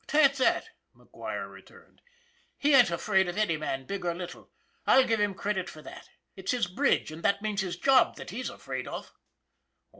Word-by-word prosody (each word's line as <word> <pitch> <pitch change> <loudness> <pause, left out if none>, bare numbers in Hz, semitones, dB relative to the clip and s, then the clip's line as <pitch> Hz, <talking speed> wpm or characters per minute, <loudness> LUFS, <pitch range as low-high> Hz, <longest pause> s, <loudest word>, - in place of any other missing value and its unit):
"'Tain't 295 -2 +5
that," 265 -2 +1 0.3
McGuire - - -7
returned. - - -17 0.6
"He 290 +1 +2
ain't 245 -7 +7
afraid 190 +2 +1
of 175 - -4
any 210 -6 +2
man, 135 -3 -3
big 200 +6 -5
or 170 -1 -1
little. 175 0 -8 0.4
I'll 265 - +7
give 225 -1 +1
him 205 -2 +1
credit 195 -2 -2
for 155 - -12
that. - - -11 0.3
It's 190 +3 -2
his 245 -5 +1
bridge, 185 - +1
and 160 +1 -9
that 200 +3 +1
means 210 -2 -1
his 185 -2 -4
job, 270 -1 +4
that - - -9
he's - - -4
afraid - - -6
of." - - -7
200 Hz, 185 wpm, -28 LUFS, 175-245 Hz, 0.6 s, ain't